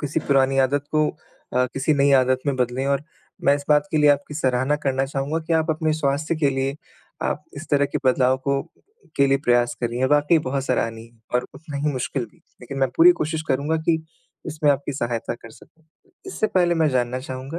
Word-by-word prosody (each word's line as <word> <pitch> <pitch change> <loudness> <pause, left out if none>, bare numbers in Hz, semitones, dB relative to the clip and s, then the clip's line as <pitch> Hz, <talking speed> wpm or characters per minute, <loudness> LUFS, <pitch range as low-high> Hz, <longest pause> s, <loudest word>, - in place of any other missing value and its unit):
किसी 145 -1 -2
पुरानी 135 -1 +2
आदत 140 +2 +2
को 155 -1 +2 0.4
अ, 125 0 +3
किसी 135 +3 +1
नई 140 0 +3
आदत 130 -1 +4
में 140 - +1
बदलें 125 +2 -1
और 140 0 +1 0.4
मैं 140 - +5
इस 140 - -9
बात 150 -1 +4
के - - -1
लिए 150 -1 +6
आपकी 145 +1 -1
सराहना 130 0 +1
करना 135 -2 -1
चाहूँगा 140 +3 -2
कि 165 - -1
आप 160 0 +2
अपने 155 0 0
स्वास्थ्य 150 +2 -1
के 145 -3 +2
लिए, 135 +1 -2 0.5
आप 150 - -2
इस 155 - -7
तरह 145 -1 +3
के - - 0
बदलाव 130 0 +3
को 140 0 +1 0.6
के 140 - +4
लिए 135 0 +2
प्रयास 120 0 +2
कर 120 - 0
रहीं 120 +1 -5
हैं। 130 - +3
वाक़ई 150 +3 +4
बहुत 135 -2 -2
सराहनीय 115 -3 -2 0.2
और 125 0 +1
उतना 150 -2 -8
ही 150 - +1
मुश्किल 130 0 -2
भी, 110 - -19 0.2
लेकिन 135 +2 -7
मैं 135 -1 +2
पूरी 175 +2 +8
कोशिश 160 +1 -2
करूँगा 145 +5 +1
कि 160 -1 +2 0.4
इसमें 155 -2 +1
आपकी 140 +1 -1
सहायता 120 -2 -3
कर 115 -1 -13
सकूँ। 160 +8 -20 0.4
इससे 295 -12 -1
पहले 175 -4 +2
मैं 160 -2 +2
जानना 125 0 0
चाहूँगा 130 +4 -6
140 Hz, 210 wpm, -22 LUFS, 130-150 Hz, 0.6 s, पूरी